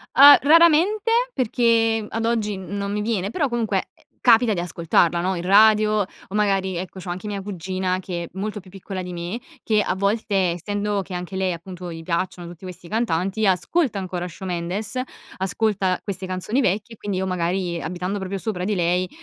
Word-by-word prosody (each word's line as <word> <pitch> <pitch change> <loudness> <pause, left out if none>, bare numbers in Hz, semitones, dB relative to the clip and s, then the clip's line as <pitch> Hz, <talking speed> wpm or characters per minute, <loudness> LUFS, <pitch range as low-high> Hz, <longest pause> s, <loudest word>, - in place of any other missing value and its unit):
Ah, 285 +1 +10
raramente, 340 +8 +5 0.2
perché 225 -2 +2
ad 225 0 -3
oggi 220 -3 0
non 200 +2 -4
mi 210 0 -1
viene, 210 -2 -1
però, 290 -3 0
comunque, 225 -5 -1
eh, - - -28 0.2
capita 225 -1 +5
di 175 - -2
ascoltarla, 170 0 +1
no, 185 +2 0
in 175 - -3
radio 210 +3 +5
o - - 0 0.3
magari, 195 -3 +1
ecco, 185 +1 -6
c'ho 180 -1 -8
anche 180 +3 -5
mia 205 -1 -3
cugina, 185 -1 -2
che 180 -2 -4
è - - -11
molto 210 +3 -4
più 185 - -16
piccola 190 0 -6
di 180 0 -6
me, 175 +6 -4 0.2
che, 215 -1 +2
a 185 - -1
volte, 200 +2 0 0.2
essendo 205 +3 -2
che, 190 -1 -7
anche 180 +2 -5
lei, 190 -1 0
appunto, 175 +1 -7
gli 165 0 -8
piacciono 175 +1 -2
tutti 170 +1 -12
questi 180 -1 -9
cantanti, 205 -1 0
ascolta 225 - +1
ancora 180 -2 -4
Shawn 185 +2 -7
Mendes, 195 +7 -3 0.4
ascolta 190 -1 0
queste 190 -2 -4
canzoni 185 +8 -1
vecchie, 215 +1 -1
quindi 200 -2 -4
io 190 - -1
magari, 180 -1 -1
abitando 180 +4 -3
proprio 190 +1 -4
sopra 185 -2 -3
di 210 +1 0
lei, 180 +1 +1
190 Hz, 185 wpm, -23 LUFS, 180-215 Hz, 0.4 s, Ah